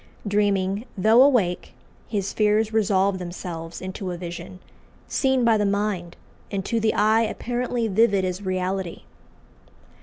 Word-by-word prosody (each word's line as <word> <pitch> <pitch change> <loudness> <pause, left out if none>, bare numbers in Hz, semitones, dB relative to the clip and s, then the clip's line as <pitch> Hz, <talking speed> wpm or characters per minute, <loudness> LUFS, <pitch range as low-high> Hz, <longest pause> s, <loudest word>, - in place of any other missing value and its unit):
Dreaming, 200 0 +1
though 220 +6 +5
awake, 240 -11 +2 0.3
his 200 -3 -2
fears 215 +1 +2
resolve 200 -3 +2
themselves 175 -1 -7
into 185 0 -5
a 175 - -4
vision, 175 +1 -7 0.5
seen 265 -2 +1
by 225 -1 +4
the 210 - +1
mind, 200 -4 -1 0.3
and 195 -2 -3
to 230 - 0
the 220 0 +1
eye 220 +1 +4
apparently 240 +1 -2
vivid 200 -2 +3
as 185 +1 -3
reality. 185 -1 -3
200 Hz, 130 wpm, -24 LUFS, 185-220 Hz, 0.5 s, though